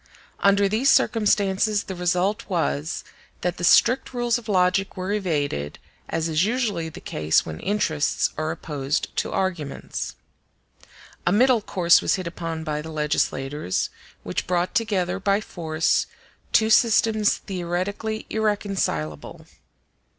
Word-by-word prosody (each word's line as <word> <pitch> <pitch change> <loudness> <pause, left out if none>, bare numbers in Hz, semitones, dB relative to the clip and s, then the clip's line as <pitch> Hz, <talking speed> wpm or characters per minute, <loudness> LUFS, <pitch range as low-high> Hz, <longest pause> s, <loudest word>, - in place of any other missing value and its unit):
Under 200 0 +4
these 225 +7 +2
circumstances 205 -3 +2
the 190 - -6
result 180 +4 0
was, 160 -4 -1 0.4
that 180 0 -1
the - - -6
strict 245 +8 +4
rules 240 -1 +1
of 230 -2 -12
logic 190 0 +2
were 185 +2 -3
evaded, 145 - -2 0.3
as 165 0 -1
is 160 +1 +2
usually 210 -7 -1
the 155 - -10
case 75 0 +1
when 80 -1 -6
interests 170 -8 0
are 155 +1 -2
opposed 145 -4 -3
to - - -1
arguments. 175 -7 -3 1.1
A - - +4
middle 240 +3 +4
course 175 -4 +4
was - - +2
hit 185 -2 -5
upon 165 -1 -4
by 150 -1 -2
the 160 +1 -8
legislators, 150 - -1 0.3
which - - -3
brought 180 0 0
together 195 -5 0
by 200 +1 +2
force 160 -6 0 0.4
two 220 0 +3
systems 220 -1 +4
theoretically 195 +4 -3
irreconcilable. 195 - -2
185 Hz, 130 wpm, -24 LUFS, 160-210 Hz, 1.1 s, Under